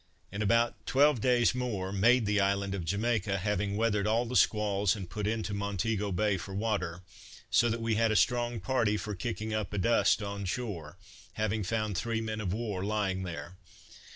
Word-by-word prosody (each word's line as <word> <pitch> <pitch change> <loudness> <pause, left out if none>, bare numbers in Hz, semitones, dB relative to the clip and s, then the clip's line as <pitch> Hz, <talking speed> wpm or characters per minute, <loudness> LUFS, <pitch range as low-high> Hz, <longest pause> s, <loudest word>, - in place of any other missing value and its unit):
In 100 +2 -4
about 115 +3 +2
twelve 140 -3 +4
days 125 0 +3
more 110 -7 -3
made 115 +4 +4
the 105 0 +2
island 100 0 +1
of 95 -3 -3
Jamaica, 100 +2 0
having 100 +1 -1
weathered 105 -2 +1
all 115 +3 +2
the 125 +2 -5
squalls, 105 -4 +3
and 95 -4 -6
put 105 +3 -3
into 110 -1 -2
Montego 100 +1 -1
Bay 100 +2 +1
for 95 +2 -7
water; 100 -5 -2 0.5
so 120 - +4
that 115 0 -2
we 115 -1 +1
had 115 +1 +2
a - - +1
strong 120 0 +2
party 115 -5 +1
for 105 0 -4
kicking 110 +2 -4
up 105 -3 -2
a - - -2
dust 110 +2 +3
on 100 0 -4
shore, 90 -7 -4 0.4
having 110 0 -1
found 105 +1 -1
three 115 +4 -1
men 110 -1 -3
of 95 -4 -2
war 105 -3 -3
lying 100 -2 -1
there. 90 0 -6
105 Hz, 185 wpm, -30 LUFS, 100-115 Hz, 0.5 s, twelve